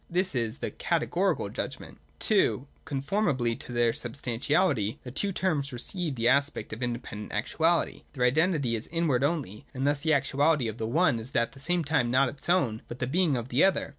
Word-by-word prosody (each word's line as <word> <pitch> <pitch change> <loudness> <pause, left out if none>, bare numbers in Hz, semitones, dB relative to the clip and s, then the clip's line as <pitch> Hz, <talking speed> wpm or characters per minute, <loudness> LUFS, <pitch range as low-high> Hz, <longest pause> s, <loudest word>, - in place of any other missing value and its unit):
This 180 +2 0
is 115 -4 -1
the - - -4
Categorical - - 0
judgment. - - -6 0.2
(2) 130 - +2 0.2
Conformably 140 - 0
to 135 -2 -9
their 120 -1 +2
substantiality, 125 - 0
the 125 - -7
two 195 +9 -1
terms 155 -7 -1
receive 150 +5 -3
the 115 -1 +1
aspect 140 -1 +2
of 115 - -7
independent 120 -3 -4
actuality. 160 +10 +1
Their 125 -3 +1
identity 145 -2 +2
is 110 - -5
then 165 - -7
inward 145 -7 +2
only; 140 - -2
and 130 +1 -1
thus 145 0 +2
the 160 +2 +1
actuality 140 0 +2
of 110 +1 -5
the 110 - -2
one 150 -1 +2
is 115 +4 -10
at 115 0 +2
the 135 - -15
same 175 +4 +1
time 140 -5 +1
not 130 +2 +3
its 145 - -9
own, 130 -12 +2
but 120 - -7
the 125 - -1
being 155 +1 +2
of 120 +1 -5
the 125 +3 +3
other. 190 -6 +2
135 Hz, 195 wpm, -28 LUFS, 120-160 Hz, 0.2 s, not